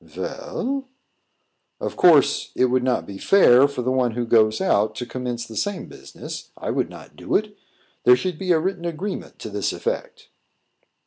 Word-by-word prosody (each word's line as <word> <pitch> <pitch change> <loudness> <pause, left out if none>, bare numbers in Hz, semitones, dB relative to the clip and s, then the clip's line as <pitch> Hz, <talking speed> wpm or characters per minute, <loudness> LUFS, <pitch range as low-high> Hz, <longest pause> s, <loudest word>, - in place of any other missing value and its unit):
"Vell?" 270 +3 -4 0.9
"Of - - -4
course, 145 -5 +4
it 125 -1 +2
would 130 0 +2
not 125 0 0
be 100 -1 -9
fair 140 -9 +6
for 140 -3 -5
the 130 - 0
one 125 -3 +1
who 120 +1 -2
goes 110 -1 +3
out 105 +1 +1
to 125 - -4
commence 125 -1 -4
the 110 - -11
same 205 - -2
business. - - -9
I - - -3
would - - -1
not - - -13
do - - -3
it. 210 -1 0 0.5
There 125 - +7
should 175 +5 -3
be 185 -2 -1
a 170 - +5
written 180 0 -3
agreement 175 +4 -5
to 110 - -8
this 100 -1 -1
effect." - - -5
130 Hz, 180 wpm, -23 LUFS, 120-180 Hz, 0.9 s, There